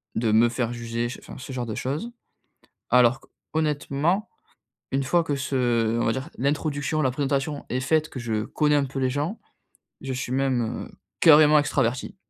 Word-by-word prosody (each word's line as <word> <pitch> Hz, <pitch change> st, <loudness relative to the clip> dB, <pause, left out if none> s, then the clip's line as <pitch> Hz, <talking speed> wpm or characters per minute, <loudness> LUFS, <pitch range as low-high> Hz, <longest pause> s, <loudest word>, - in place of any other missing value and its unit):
de 110 Hz, -2 st, +1 dB
me 115 Hz, +2 st, +5 dB
faire 120 Hz, 0 st, -2 dB
juger, 115 Hz, 0 st, -3 dB
ch 125 Hz, -, -7 dB
enfin, -, -, -11 dB
ce 130 Hz, +1 st, -8 dB
genre 125 Hz, -2 st, -3 dB
de 110 Hz, -, -5 dB
choses. 150 Hz, -, -3 dB, 0.8 s
Alors 125 Hz, +1 st, +4 dB, 0.3 s
qu'honnêtement, 155 Hz, +5 st, 0 dB, 0.6 s
une 135 Hz, 0 st, 0 dB
fois 170 Hz, +5 st, +2 dB
que 145 Hz, -3 st, -2 dB
ce, 135 Hz, 0 st, -4 dB
heu, 115 Hz, -2 st, +1 dB
on -, -, 0 dB
va 115 Hz, -, +2 dB
dire 130 Hz, +6 st, -5 dB
l'introduction, 145 Hz, +2 st, -1 dB
la 130 Hz, -, +2 dB
présentation 140 Hz, +2 st, -2 dB
est 130 Hz, -, -1 dB
faite, 155 Hz, +3 st, +1 dB
que 130 Hz, -, -8 dB
je 110 Hz, -3 st, -2 dB
connais 150 Hz, +3 st, +1 dB
un 140 Hz, -1 st, +1 dB
peu 135 Hz, +1 st, -6 dB
les 130 Hz, -1 st, +1 dB
gens, 150 Hz, -, -2 dB, 0.6 s
je 135 Hz, -, -4 dB
suis 125 Hz, -1 st, -4 dB
même, 135 Hz, -1 st, +1 dB, 0.3 s
heu, -, -, -24 dB, 0.3 s
carrément 150 Hz, -1 st, +7 dB
extraverti. 130 Hz, -2 st, -1 dB
135 Hz, 185 wpm, -25 LUFS, 120-150 Hz, 0.8 s, carrément